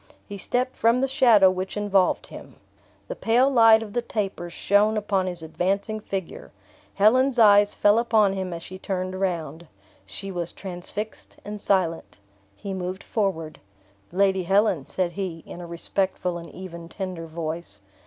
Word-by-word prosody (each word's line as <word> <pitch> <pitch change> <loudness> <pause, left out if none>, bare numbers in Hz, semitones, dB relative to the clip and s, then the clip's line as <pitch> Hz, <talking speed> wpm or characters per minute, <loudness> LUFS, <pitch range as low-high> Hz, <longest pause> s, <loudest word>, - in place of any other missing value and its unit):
He 200 -2 -7
stepped 250 +5 -1
from 230 +2 +3
the 270 - +1
shadow 235 -8 +5
which 185 +2 -4
involved 200 -3 +2
him. - - -12 0.5
The - - -5
pale 245 +4 +3
light 225 -3 +6
of 210 -2 -10
the 240 - 0
tapers 195 -6 -4
shone 205 +5 +2
upon 195 -3 0
his 175 -3 -5
advancing 195 +6 -1
figure. 195 -4 -6 0.4
Helen's 255 +6 +4
eyes 205 -2 +6
fell 205 +2 +4
upon 220 -4 +3
him 190 -1 -4
as 170 -1 -6
she 185 +1 -9
turned 185 -1 -3
round. 170 -4 -3 0.4
She 195 0 -6
was 175 -2 -4
transfixed 190 +3 -7
and 210 0 -6
silent. 180 -6 0 0.4
He 195 - -6
moved 185 0 -5
forward. 190 -8 -2 0.5
"Lady 190 +1 +2
Helen," 195 -4 +2
said 180 -2 -1
he, 175 -3 -5
in 175 - -9
a 175 - -8
respectful 180 +1 -2
and 170 - -10
even 170 -3 -9
tender 185 -4 -6
voice. 165 +1 -5
195 Hz, 155 wpm, -24 LUFS, 175-210 Hz, 0.5 s, light